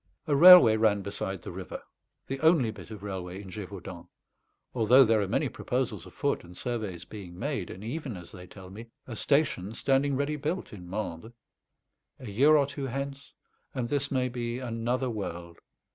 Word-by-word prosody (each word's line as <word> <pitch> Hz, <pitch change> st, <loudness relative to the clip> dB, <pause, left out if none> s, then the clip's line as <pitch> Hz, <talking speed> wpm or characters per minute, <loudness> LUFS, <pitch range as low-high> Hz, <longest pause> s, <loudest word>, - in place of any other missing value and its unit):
A 150 Hz, -, +1 dB
railway 165 Hz, -9 st, +9 dB
ran 105 Hz, -2 st, +2 dB
beside 95 Hz, -2 st, -4 dB
the -, -, -6 dB
river; -, -, -7 dB, 0.5 s
the 135 Hz, 0 st, -4 dB
only 160 Hz, -7 st, +4 dB
bit 100 Hz, -4 st, -12 dB
of 105 Hz, -3 st, -9 dB
railway 95 Hz, -2 st, -5 dB
in 95 Hz, -2 st, -10 dB
Gévaudan, 95 Hz, -4 st, -8 dB, 0.7 s
although 125 Hz, +3 st, +6 dB
there 110 Hz, -1 st, +3 dB
are 100 Hz, -, -1 dB
many -, -, 0 dB
proposals -, -, -3 dB
afoot -, -, -2 dB
and 90 Hz, +1 st, -13 dB
surveys 105 Hz, -8 st, -4 dB
being 95 Hz, -5 st, -10 dB
made, 135 Hz, -, -3 dB
and 95 Hz, -, -9 dB
even, 125 Hz, -, -5 dB
as 90 Hz, -1 st, -11 dB
they 90 Hz, -1 st, -11 dB
tell 95 Hz, 0 st, -12 dB
me, 110 Hz, +4 st, -10 dB, 0.2 s
a 120 Hz, -, -7 dB
station 140 Hz, -, +1 dB
standing 135 Hz, +3 st, +1 dB
ready 145 Hz, +2 st, -1 dB
built 155 Hz, +3 st, -3 dB
in 90 Hz, -4 st, -10 dB
Mende. 105 Hz, +2 st, -5 dB, 0.8 s
A 120 Hz, -5 st, -8 dB
year 145 Hz, +9 st, +5 dB
or 140 Hz, -, +3 dB
two 140 Hz, -1 st, -5 dB
hence 140 Hz, +2 st, -6 dB, 0.4 s
and 120 Hz, -3 st, -2 dB
this 140 Hz, 0 st, -1 dB
may 130 Hz, -2 st, 0 dB
be 120 Hz, -1 st, -4 dB
another 125 Hz, +1 st, -2 dB
world. 85 Hz, -5 st, -6 dB
115 Hz, 175 wpm, -28 LUFS, 95-135 Hz, 0.8 s, railway